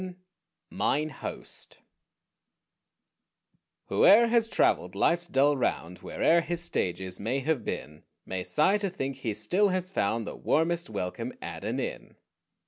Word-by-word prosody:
XI 185 -1 -7 0.6
MINE 150 +2 0
HOST 135 - -8 2.1
Whoe'er 230 +3 +6
has 230 -1 +3
traveled - - +1
life's 175 +1 +2
dull 145 +1 +3
round, 90 -8 -2
Where'er 170 +1 +2
his 175 0 -4
stages 95 - -2
may 125 +7 -1
have 150 -4 0
been, 75 -5 -5 0.2
May 95 -1 -4
sigh 190 - +3
to 200 -1 -1
think 135 -7 -4
he 115 -6 -3
still 180 - +2
has 185 0 -2
found 115 - 0
The - - -6
warmest 170 0 0
welcome 90 -4 -4
at - - -7
an - - -2
inn. - - -5
150 Hz, 135 wpm, -28 LUFS, 105-180 Hz, 2.1 s, Whoe'er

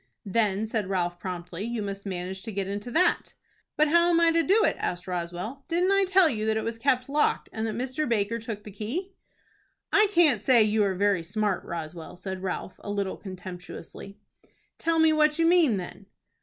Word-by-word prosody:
"Then," 210 0 +1
said 220 -3 -2
Ralph, 175 -2 -1
promptly, 180 -1 -6
"you 230 -1 -3
must 200 0 -6
manage 185 0 -4
to 225 - -6
get 195 -1 -3
into 205 +4 -4
that." 340 +9 +1 0.4
"But 305 0 +4
how 340 +2 +4
am 335 -1 +4
I 335 0 +5
to 330 0 +3
do 400 +8 +3
it?" - - +2
asked 175 -1 -3
Roswell. 180 +9 -4
"Didn't 355 +3 +1
I 395 0 +4
tell 375 -1 +5
you 220 -6 -1
that 220 0 +1
it 220 - -1
was 230 0 -4
kept 255 0 +1
locked, 295 +2 +1
and 220 0 -2
that 215 - -3
Mr. 260 +4 -2
Baker 230 0 0
took 220 -2 -6
the 210 - -10
key?" 265 - -5 0.8
"I 425 +1 +6
can't 320 - +4
say 245 -4 +5
you 215 0 +2
are 190 -1 0
very 200 -2 +2
smart. 200 +3 -1
Roswell," 165 0 -6
said 185 +1 -6
Ralph, 185 0 -5
a - - -9
little 200 -2 -2
contemptuously. 185 +1 -9 0.6
"Tell 330 0 +1
me 320 -1 +5
what 305 0 +3
you 330 - +3
mean, 330 - +4
then." 190 +2 -8
215 Hz, 200 wpm, -27 LUFS, 190-300 Hz, 0.8 s, I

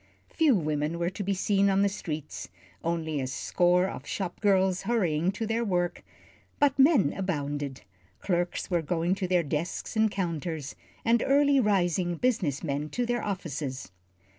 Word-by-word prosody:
Few 310 -6 +4
women 155 -1 -1
were 170 +1 -1
to 205 - -6
be 195 +1 0
seen 200 +1 +2
on 195 0 +3
the - - +4
streets, 155 -6 -5 0.3
only 160 -3 -1
a 130 - -2
score 180 +6 +2
of - - -7
shop 185 -3 -4
girls 190 -2 +3
hurrying 180 -7 +1
to 225 - -3
their 225 +2 0
work, 175 -4 -1 0.5
but 280 -1 +2
men 270 - +5
abounded. 145 -7 -3 0.4
Clerks 175 0 -1
were 175 -1 +2
going 170 +2 0
to 195 -1 -2
their 180 -1 +2
desks 155 +8 -3
and 220 0 +3
counters, 165 -6 -3 0.3
and 235 0 +4
early 280 0 +4
rising 180 -5 +1
business 180 - 0
men 145 0 -2
to 245 +7 -1
their 240 0 -1
offices. 145 - -4
180 Hz, 160 wpm, -28 LUFS, 160-205 Hz, 0.5 s, men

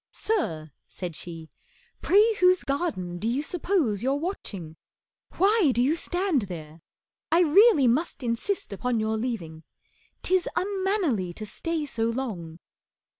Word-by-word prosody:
"Sir," 160 - -2 0.2
said 175 -4 -6
she, 165 -1 -7 0.5
"pray 425 +4 +5
whose 365 0 +4
Garden 205 - -2
do 220 - -2
you 255 +5 0
suppose 320 - 0
you're 265 +3 +1
watching? 205 - -5 0.6
Why 395 -5 +4
Do - - +1
you 270 +6 +3
stand 355 -4 0
there? 160 -2 -8 0.5
I 335 - +5
really 345 - +6
must 275 +4 0
insist 235 - -2
Upon 240 +3 -1
your 220 0 0
leaving. 210 -9 -4 0.6
'Tis 370 -1 +2
unmannerly 375 - 0
To 215 - -7
stay 320 +8 -3
so 230 -5 -1
long." 205 -10 -4
260 Hz, 130 wpm, -26 LUFS, -, 0.6 s, really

